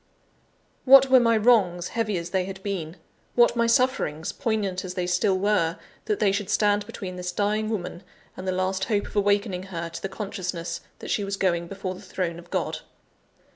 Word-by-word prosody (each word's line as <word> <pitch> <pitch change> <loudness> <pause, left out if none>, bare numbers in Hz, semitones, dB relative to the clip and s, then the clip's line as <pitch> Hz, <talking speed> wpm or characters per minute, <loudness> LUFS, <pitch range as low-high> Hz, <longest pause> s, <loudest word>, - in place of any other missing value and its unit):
What 270 0 +7
were 260 - +8
my 230 -2 +3
wrongs, 200 -6 +3
heavy 215 -4 -1
as 170 0 -5
they 190 -1 +1
had 190 0 -8
been; 180 -4 -4 0.4
what 240 0 +5
my 235 0 +2
sufferings, 230 - +1
poignant 205 -5 -2
as 185 -1 -6
they 180 -2 -1
still 190 +2 +2
were, 185 -4 +1 0.3
that 425 -2 -1
they 200 - +3
should 200 -1 -2
stand 205 -1 +2
between 190 -5 -7
this 180 0 -3
dying 210 +3 0
woman, 180 -5 -4 0.3
and 185 - -7
the - - +2
last 185 +1 -1
hope 210 -3 0
of - - -11
awakening 205 -2 +1
her 170 -2 -4
to 165 - -8
the 195 - -3
consciousness 185 -4 -4 0.2
that - - -6
she 205 - +1
was 200 0 -3
going 170 -3 0
before 195 0 -5
the 185 - -11
throne 180 -3 -3
of 175 0 -15
God? - - -2
195 Hz, 195 wpm, -25 LUFS, 180-210 Hz, 0.4 s, were